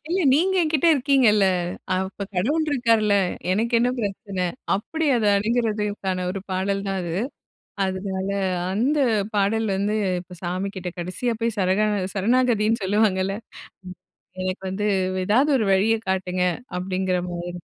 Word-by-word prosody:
இல்ல, 360 - 0
நீங்க 370 +7 +3
என்கிட்ட 310 0 +1
இருக்கீங்கல்ல, 250 -7 +4 0.5
அப்ப 190 +2 -3
கடவுள் 290 - +1
இருக்காருல்ல. 230 -6 +3 0.4
எனக்கு 225 +5 0
என்ன 245 +1 +2
பிரச்சன? 195 -3 -3 0.3
அப்டி 315 +11 -2
அத 225 - 0
அணுகுறதுக்கான 210 -4 -1
ஒரு 195 0 -4
பாடல் 195 +1 -1
தான் 195 0 -1
அது. 170 -1 -4 0.7
அதுனால, 190 0 -3 0.4
அந்த 255 +9 +1 0.4
பாடல் 220 +3 +1
வந்து 205 +2 0 0.2
இப்ப 180 0 -12
சாமி 185 +3 -2
கிட்ட 180 -1 -4
கடைசியா 185 +8 -2
போயி 230 0 0
சரணா 190 +3 +2 0.3
சரணாகதின்னு 225 0 +2
சொல்லுவாங்கல்ல. 195 -1 +1 1.1
"எனக்கு 185 +1 -3
வந்து 205 +2 -2 0.4
ஏதாவது 260 +8 +3
ஒரு 220 - 0
வழிய 210 +4 +3
காட்டுங்க." 185 -1 -1 0.4
அப்டிங்கிற 185 0 -1
மாரி. 175 +1 -5
200 Hz, 125 wpm, -23 LUFS, 190-230 Hz, 1.1 s, இருக்கீங்கல்ல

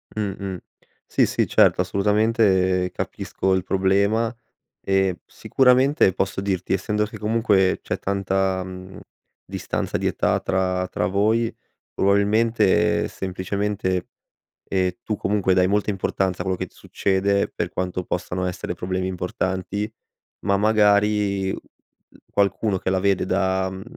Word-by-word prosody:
Mh-mh, 100 -3 -3 0.5
sì, - - +3
sì, - - 0
certo, - - +4
assolutamente, 100 -3 +2
capisco 95 0 -2
il 95 -1 +1
problema, 100 +5 +1 0.5
e 95 -2 +1
sicuramente 130 - +3
posso 95 0 -2
dirti, 95 -2 -1
essendo 105 +3 0
che 105 - -9
comunque 105 -4 +2
c'è - - -3
tanta, 95 -1 0
mhmm, 95 0 -9 0.5
distanza - - -3
di - - -4
età - - +1
tra 95 -1 -1
tra - - -1
voi, 110 +4 +1 0.4
probabilmente 105 +1 +2
semplicemente 95 0 -2 0.7
e 90 -1 0
tu 105 - -2
comunque 100 -2 +1
dai 90 -1 +4
molta 105 +2 +1
importanza 95 -1 -1
a - - -8
quello 95 -1 -1
che - - -3
ti - - -25
succede, 100 +1 0
per - - -3
quanto 90 0 -3
possano 90 +1 -3
essere 90 0 -4
problemi 95 +1 -2
importanti, 95 +3 -3 0.5
ma 100 - +2
magari 105 -2 +2
u - - -3 0.7
qualcuno 100 0 +1
che 95 - -2
la 95 -1 +1
vede 100 -1 +1
da 95 0 +1
mhmm, 95 0 -8
95 Hz, 130 wpm, -23 LUFS, 95-105 Hz, 0.7 s, certo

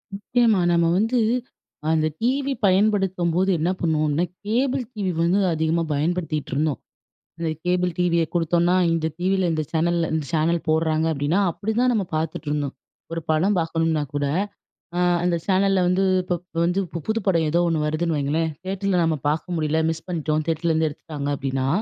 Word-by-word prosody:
முக்கியமா 225 0 +2
நம்ம 170 -1 +3
வந்து, 225 +5 +2 0.7
அந்த 155 -1 +2
டீவி 270 +3 +1
பயன்படுத்தும்போது 190 -2 +2
என்ன 165 - +1
பண்ணுவோம்னா, 155 0 +1 0.2
கேபிள் 255 +4 +1
டிவி 200 -5 -2
வந்து 180 +4 +3
அதிகமா 160 +1 +1
பயன்படுத்திட்டிருந்தோம். 155 -2 -1 0.6
அந்த 165 -1 -2 0.2
கேபிள் 180 0 +1
டிவிய 170 -2 +2
குடுத்தோம்னா, 175 +1 +2 0.2
இந்த 160 -1 0
டிவில, 190 0 +1
இந்த 155 -1 -1
சேனல்ல 170 0 +1
இந்த 155 -2 -1
சேனல் 165 +1 +2
போட்றாங்க 160 0 +2
அப்டின்னா, 150 +7 +1
அப்டிதான் 220 +8 0
நம்ம 205 -5 0
பாத்துட்டுருந்தோம். 150 -3 -2 0.4
ஒரு 165 - -3
படம் 185 +6 +2
பாக்கணும்னா 165 -1 0
கூட, 145 0 0 0.7
அ - - +1 0.2
அந்த 175 -1 +2
சேனல்ல 195 0 +3
வந்து 180 +2 +2 0.2
இப்போ 180 0 -1 0.3
வந்து 180 +3 +1
இப்போ 170 - -6
புது 220 +1 +1
படம் 170 -5 +2
ஏதோ 170 +3 +2
ஒண்ணு 160 -2 0
வருதுன்னு 155 +1 0
வைங்களேன், 155 +3 0
தியேட்டரில 195 -1 0
நம்ம 160 -1 +1
பாக்க 155 +2 -1
முடியல 155 0 +1
மிஸ் 160 0 -4
பண்ணிட்டோம் 155 -3 -1
தியேட்டர்லேருந்து 160 0 +1
எடுத்துட்டாங்க 145 -1 -6
அப்டின்னா, 135 -1 -2
170 Hz, 150 wpm, -23 LUFS, 155-190 Hz, 0.7 s, நம்ம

